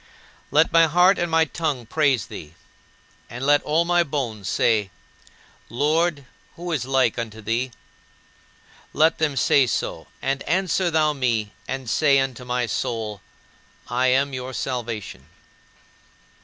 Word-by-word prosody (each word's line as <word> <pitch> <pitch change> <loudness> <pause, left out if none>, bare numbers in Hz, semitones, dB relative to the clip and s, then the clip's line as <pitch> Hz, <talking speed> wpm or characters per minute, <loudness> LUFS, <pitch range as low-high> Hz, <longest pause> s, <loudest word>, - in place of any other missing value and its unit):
" - - -28
Let 155 +2 +3
my 165 -1 +6
heart 180 +5 +4
and 175 -1 -1
my 160 0 +3
tongue 150 -6 -3
praise 140 -1 +1
thee, 75 +2 -10 0.7
and 125 +3 -5
let 145 0 +4
all 160 +3 +1
my 175 0 +3
bones 125 - -3
say, 110 -4 +1 0.8
"Lord, 150 +2 0 0.3
who 175 +1 -6
is 140 -7 -1
like 130 -3 +1
unto 110 -2 -5
thee?" 115 +4 -1 1.2
Let 160 +2 +3
them 150 -3 0
say 130 +1 +4
so, - - -3
and 135 0 -2
answer 185 +1 +1
thou 155 -2 +2
me 115 -7 -1
and 135 -1 -5
say 140 +3 +3
unto 130 -2 -1
my 125 0 -1
soul, 110 -2 -3 0.7
"I 125 +2 +1
am 135 +2 +2
your 130 0 -5
salvation." 115 - -5
135 Hz, 140 wpm, -23 LUFS, 120-155 Hz, 1.2 s, my